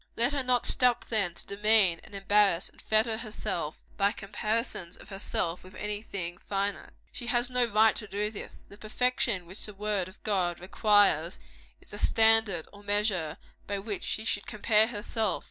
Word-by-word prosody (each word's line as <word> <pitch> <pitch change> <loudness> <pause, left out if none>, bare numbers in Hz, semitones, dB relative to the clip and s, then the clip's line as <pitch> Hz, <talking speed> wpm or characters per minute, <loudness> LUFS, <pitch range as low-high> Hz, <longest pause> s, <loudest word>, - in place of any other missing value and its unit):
Let 240 +5 +2
her 280 - 0
not 250 -2 +1
stop, 250 -2 +3
then, 200 -7 0
to - - -7
demean, 200 -4 +3
and - - -12
embarrass, 195 -2 +2
and - - -18
fetter 220 +1 +1
herself 210 -8 -4
by 200 0 +2
comparisons 205 -3 -3
of - - -14
herself 195 -3 -2
with 185 0 -14
any 210 0 -3
thing 175 -5 -6
finite. 200 0 -3 0.2
She 240 - -6
has 240 +2 +1
no 250 -1 +2
right 220 -1 +3
to 215 - -5
do 205 +2 -2
this. 210 - -10
The 200 - -15
perfection 230 -4 0
which 190 +6 -10
the 210 - -11
word 205 -2 -1
of 190 - -18
God 180 -5 0
requires, 205 - +2 0.4
is - - -16
the 205 - -7
standard 220 -7 +4
or 205 - -13
measure 205 -6 0 0.3
by 200 - -2
which 200 0 -5
she 220 - -3
should 200 -2 0
compare 215 +1 +3
herself. 215 -3 -2
210 Hz, 180 wpm, -28 LUFS, 195-220 Hz, 0.4 s, standard